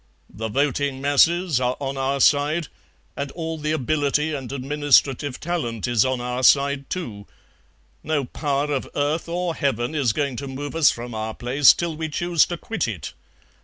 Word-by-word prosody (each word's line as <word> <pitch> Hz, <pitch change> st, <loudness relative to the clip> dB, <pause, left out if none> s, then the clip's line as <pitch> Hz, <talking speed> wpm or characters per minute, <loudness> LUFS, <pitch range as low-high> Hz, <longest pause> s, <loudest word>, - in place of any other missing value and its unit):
The 110 Hz, +2 st, -4 dB
voting 140 Hz, +2 st, 0 dB
masses 155 Hz, +2 st, +3 dB
are 125 Hz, 0 st, 0 dB
on 135 Hz, -1 st, -3 dB
our 135 Hz, +1 st, -1 dB
side, 150 Hz, +3 st, +2 dB, 0.5 s
and 140 Hz, 0 st, -4 dB
all 165 Hz, -1 st, -4 dB
the 150 Hz, 0 st, -2 dB
ability 150 Hz, +1 st, 0 dB
and 135 Hz, -4 st, -5 dB
administrative 140 Hz, -1 st, +1 dB
talent 125 Hz, -, -3 dB
is 120 Hz, -3 st, +3 dB
on 130 Hz, -1 st, -1 dB
our 125 Hz, +1 st, -3 dB
side 140 Hz, +1 st, +3 dB
too. 110 Hz, -, -5 dB, 0.8 s
No 150 Hz, -3 st, 0 dB
power 145 Hz, +2 st, -1 dB
of 135 Hz, -, -3 dB
earth 150 Hz, +4 st, -1 dB
or 175 Hz, 0 st, -1 dB
Heaven 130 Hz, -3 st, -1 dB
is 140 Hz, -7 st, +1 dB
going 140 Hz, 0 st, -2 dB
to 140 Hz, -, -5 dB
move 145 Hz, +3 st, -6 dB
us 165 Hz, -3 st, +5 dB
from 120 Hz, 0 st, -5 dB
our 110 Hz, 0 st, -4 dB
place 130 Hz, +3 st, +5 dB
till 170 Hz, -2 st, -3 dB
we 160 Hz, 0 st, -4 dB
choose 170 Hz, +1 st, +2 dB
to 175 Hz, -, -4 dB
quit 210 Hz, -, -3 dB
it. 95 Hz, -10 st, -6 dB
140 Hz, 170 wpm, -23 LUFS, 130-155 Hz, 0.8 s, us